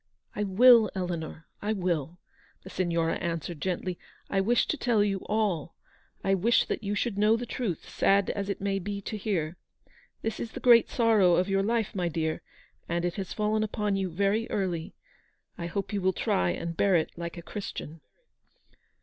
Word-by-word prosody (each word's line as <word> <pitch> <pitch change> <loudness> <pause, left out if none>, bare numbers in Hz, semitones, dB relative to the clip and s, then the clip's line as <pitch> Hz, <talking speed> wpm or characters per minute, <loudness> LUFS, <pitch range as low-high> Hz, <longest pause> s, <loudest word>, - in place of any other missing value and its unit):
u - - -2
I - - +2
will, 230 +3 +7
Eleanor, 170 -3 -4 0.2
I 210 +1 0
will," 175 -5 -2 0.5
the - - -10
Signora 170 -2 0
answered 165 -2 -4
gently. 180 -1 -2 0.2
" - - -32
I 195 - +2
wish 235 +5 +3
to - - +1
tell 235 -7 +2
you 195 -2 0
all. 200 -7 0 0.5
I 195 - +2
wish 215 +5 +3
that - - -3
you 205 +1 -1
should 205 -1 -1
know 215 +2 +4
the 245 - -4
truth, 220 -8 -3
sad 200 0 +2
as 200 0 -4
it 200 - -2
may 195 0 -1
be 200 +2 -4
to 215 - -5
hear. 180 -6 -2 0.7
This 225 - -2
is 230 - -5
the - - -5
great 235 -2 +6
sorrow 215 -7 +4
of 180 +3 +1
your 195 0 +2
life, 225 +1 0
my 180 -4 -1
dear, 160 -1 -2 0.5
and 170 +1 0
it 175 - -1
has 190 -2 -4
fallen 215 0 0
upon 210 -2 -1
you 190 -1 -1
very 200 +6 0
early. 180 -5 -2 0.6
I 170 - -5
hope 200 +4 -4
you 200 - 0
will 190 0 +2
try 90 - +1
and 170 - -3
bear 195 +1 +3
it 160 - +1
like 170 0 -6
a 170 - -7
Christian." 165 -5 -7
195 Hz, 190 wpm, -28 LUFS, 170-210 Hz, 0.7 s, will